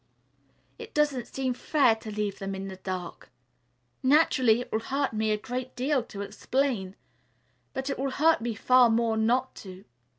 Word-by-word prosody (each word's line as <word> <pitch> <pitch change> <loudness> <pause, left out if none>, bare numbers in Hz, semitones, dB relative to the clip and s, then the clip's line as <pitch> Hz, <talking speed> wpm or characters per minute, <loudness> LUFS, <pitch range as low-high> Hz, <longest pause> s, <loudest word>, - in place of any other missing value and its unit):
It - - -10
doesn't 290 -5 +1
seem 260 -1 -2
fair 265 -1 +3
to 220 - -9
leave 210 -1 -3
them 195 0 -4
in 195 0 -5
the 190 - -8
dark. 185 -2 -6 0.7
Naturally 260 -5 +4
it - - -9
will 220 - +1
hurt 270 +3 -2
me 220 0 0
a 215 - +2
great 250 +4 -5
deal 265 +2 +1
to 200 - -8
explain, 205 -1 -2 0.8
but 265 0 -4
it 275 - -3
will 275 +1 0
hurt 310 +1 +3
me 235 -1 -3
far 250 +2 +5
more 225 0 +2
not 245 +4 +1
to. 190 -1 -11
240 Hz, 170 wpm, -27 LUFS, 210-265 Hz, 0.8 s, far